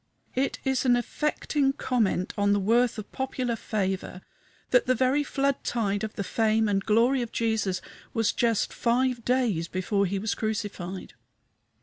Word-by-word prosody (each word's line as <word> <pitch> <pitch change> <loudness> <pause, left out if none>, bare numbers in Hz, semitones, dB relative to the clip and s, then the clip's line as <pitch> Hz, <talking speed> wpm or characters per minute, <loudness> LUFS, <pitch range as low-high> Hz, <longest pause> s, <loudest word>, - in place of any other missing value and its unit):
It 265 +2 0
is 265 -1 +1
an 250 -2 +4
affecting 275 +2 0
comment 225 -9 0
on 205 -1 +2
the 205 - +2
worth 230 +4 +2
of 215 - -7
popular 255 -2 -2
favor 190 -4 -3 0.5
that - - +4
the 255 - +3
very 260 +4 +2
flood 275 -1 -1
tide 205 -4 -1
of 220 - -4
the 200 - -2
fame 220 +2 +2
and 195 -1 +1
glory 235 +5 +3
of 235 - -4
Jesus 215 -5 0 0.3
was 225 -3 +1
just 230 -3 +1
five 245 0 +1
days 235 -10 +1
before 195 +3 0
he 195 +2 -2
was 215 +3 -1
crucified. 205 -4 -4
225 Hz, 155 wpm, -27 LUFS, 200-255 Hz, 0.5 s, an